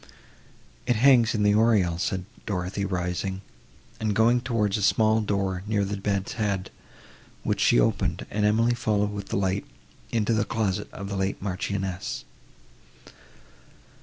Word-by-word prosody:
"It 125 Hz, -, +3 dB
hangs 120 Hz, -1 st, +5 dB
in 105 Hz, -, +1 dB
the 105 Hz, 0 st, +4 dB
oriel," 105 Hz, -6 st, +3 dB
said 95 Hz, 0 st, -2 dB, 0.2 s
Dorothée 100 Hz, 0 st, -2 dB
rising, 90 Hz, +2 st, -2 dB, 0.6 s
and 110 Hz, -2 st, -1 dB
going 120 Hz, +3 st, +4 dB
towards 115 Hz, -5 st, 0 dB
a -, -, -3 dB
small 110 Hz, +2 st, +3 dB
door 100 Hz, -3 st, -1 dB
near 105 Hz, -2 st, +1 dB
the 100 Hz, +1 st, -3 dB
bed's 100 Hz, -1 st, -2 dB
head, 100 Hz, -3 st, -1 dB, 0.7 s
which -, -, -1 dB
she -, -, +4 dB
opened, -, -, 0 dB
and 105 Hz, +1 st, -1 dB
Emily 115 Hz, +3 st, +3 dB
followed 105 Hz, -4 st, 0 dB
with 100 Hz, -1 st, -6 dB
the -, -, -2 dB
light 95 Hz, 0 st, -1 dB, 0.4 s
into 115 Hz, 0 st, +1 dB
the 110 Hz, -1 st, +2 dB
closet 105 Hz, -4 st, -2 dB
of 100 Hz, -, -7 dB
the 100 Hz, -, -4 dB
late 95 Hz, 0 st, -1 dB
Marchioness. 95 Hz, -8 st, -3 dB
100 Hz, 145 wpm, -26 LUFS, 95-110 Hz, 0.7 s, hangs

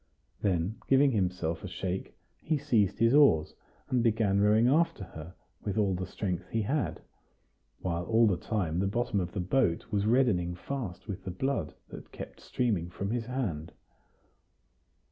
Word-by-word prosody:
Then, 95 Hz, +1 st, 0 dB
giving 135 Hz, +1 st, +5 dB
himself 90 Hz, -6 st, -1 dB
a -, -, -4 dB
shake, 95 Hz, 0 st, -4 dB, 0.2 s
he 155 Hz, -1 st, 0 dB
seized 110 Hz, -9 st, +2 dB
his 115 Hz, +2 st, +4 dB
oars, 140 Hz, -, +5 dB, 0.3 s
and 125 Hz, -2 st, +1 dB
began 110 Hz, -4 st, +2 dB
rowing 105 Hz, +3 st, +5 dB
after 150 Hz, -5 st, +2 dB
her 85 Hz, -1 st, -10 dB, 0.3 s
with 100 Hz, 0 st, -2 dB
all 100 Hz, -3 st, +2 dB
the 90 Hz, 0 st, -3 dB
strength 90 Hz, -5 st, -3 dB
he 115 Hz, -1 st, 0 dB
had, 140 Hz, +6 st, -1 dB, 0.8 s
while 85 Hz, -1 st, -2 dB
all 115 Hz, +3 st, +4 dB
the 100 Hz, -4 st, +3 dB
time 85 Hz, -3 st, -2 dB
the 95 Hz, -, +1 dB
bottom 120 Hz, 0 st, 0 dB
of 90 Hz, -1 st, -2 dB
the 100 Hz, -, -3 dB
boat 90 Hz, -1 st, +1 dB
was 100 Hz, 0 st, +1 dB
reddening 105 Hz, -8 st, +2 dB
fast 110 Hz, -2 st, -5 dB
with 100 Hz, -2 st, -5 dB
the 95 Hz, -, -5 dB
blood 95 Hz, -, -2 dB
that -, -, -10 dB
kept -, -, -9 dB
streaming 105 Hz, -9 st, -1 dB
from 100 Hz, +3 st, -4 dB
his 120 Hz, -1 st, -2 dB
hand. 100 Hz, -, -3 dB
100 Hz, 165 wpm, -30 LUFS, 90-120 Hz, 0.8 s, giving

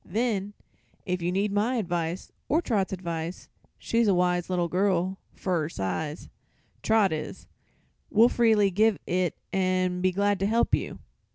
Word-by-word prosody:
Then, 210 Hz, -3 st, -1 dB, 0.5 s
if 180 Hz, -2 st, -2 dB
you 175 Hz, +1 st, 0 dB
need 200 Hz, +2 st, 0 dB
my 215 Hz, +5 st, +1 dB
advice, 175 Hz, -5 st, -2 dB, 0.2 s
or 310 Hz, -, +3 dB
Trot's 215 Hz, -, 0 dB
advice 170 Hz, -2 st, -5 dB, 0.3 s
she's 230 Hz, -1 st, +1 dB
a 195 Hz, -, +4 dB
wise 180 Hz, 0 st, +1 dB
little 175 Hz, -2 st, 0 dB
girl, 185 Hz, +1 st, 0 dB, 0.2 s
fer 180 Hz, -4 st, -1 dB
her 155 Hz, -, -3 dB
size, 150 Hz, -, -4 dB, 0.5 s
Trot 220 Hz, -3 st, +3 dB
is 155 Hz, -, -6 dB, 0.6 s
we'll 225 Hz, +2 st, +6 dB
freely 220 Hz, -5 st, +3 dB
give 215 Hz, +2 st, +3 dB
it 180 Hz, -2 st, 0 dB, 0.2 s
an' 185 Hz, -1 st, +1 dB
be 185 Hz, 0 st, +3 dB
glad 200 Hz, +1 st, +1 dB
to 195 Hz, -, +1 dB
help 230 Hz, +2 st, +1 dB
you." -, -, 0 dB
185 Hz, 155 wpm, -27 LUFS, 175-210 Hz, 0.6 s, we'll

